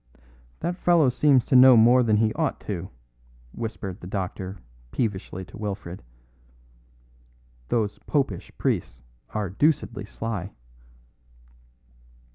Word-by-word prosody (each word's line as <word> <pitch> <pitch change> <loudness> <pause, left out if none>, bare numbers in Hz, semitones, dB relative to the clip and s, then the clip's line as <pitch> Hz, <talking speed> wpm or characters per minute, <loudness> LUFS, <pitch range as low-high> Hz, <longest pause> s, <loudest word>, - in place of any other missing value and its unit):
"That 175 +2 -2
fellow 170 -7 +4
seems 135 0 +3
to 135 - +1
know 130 -1 +9
more 120 +3 +6
than 110 -3 +3
he 110 0 +2
ought - - -1
to," 95 -3 -5 0.6
whispered 100 - -6
the 90 - -8
doctor 95 0 -4 0.3
peevishly 95 - -3
to - - -13
Wilfred. 100 -4 -5 1.7
"Those 105 -3 0
popish 135 - -1
priests - - -2 0.3
are 105 -4 -3
deucedly 120 - 0
sly." 105 -3 -5
110 Hz, 105 wpm, -25 LUFS, 95-125 Hz, 1.7 s, know